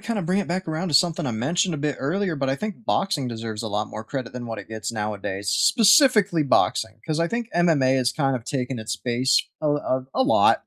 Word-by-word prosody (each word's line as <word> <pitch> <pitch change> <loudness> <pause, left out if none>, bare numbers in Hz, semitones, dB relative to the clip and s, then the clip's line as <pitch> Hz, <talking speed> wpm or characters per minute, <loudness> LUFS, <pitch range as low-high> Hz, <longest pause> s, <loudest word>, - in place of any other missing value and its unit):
kinda 215 -1 -3
bring 180 +3 0
it 200 - -1
back 180 +1 -3
around 160 +4 -2
to 150 - -3
something 165 0 +3
I 125 - -1
mentioned 165 - 0
a 150 - -3
bit 150 -1 -2
earlier, 170 +5 -1
but 135 -1 -1
I 135 - +1
think 215 +6 -6
boxing 180 -12 0
deserves 115 -2 -5
a 110 - -4
lot 105 +1 -2
more 110 - -7
credit 130 +1 -5
than 125 -1 -6
what 115 -2 -5
it 100 - -10
gets 110 0 -5
nowadays, 100 -2 -4
specifically 215 - +4
boxing, 110 -4 +1
'cause 155 -1 -2
I 170 - +2
think 230 +4 -3
MMA 155 -7 +3
has 125 -1 +1
kind 135 -3 0
of 120 - -9
taken 130 -2 -3
its 110 0 -4
base 125 +3 +1 0.2
a - - -7
l 145 0 +2 0.4
a - - 0
a - - +7
lot. 280 - +4
140 Hz, 240 wpm, -23 LUFS, 115-180 Hz, 0.4 s, a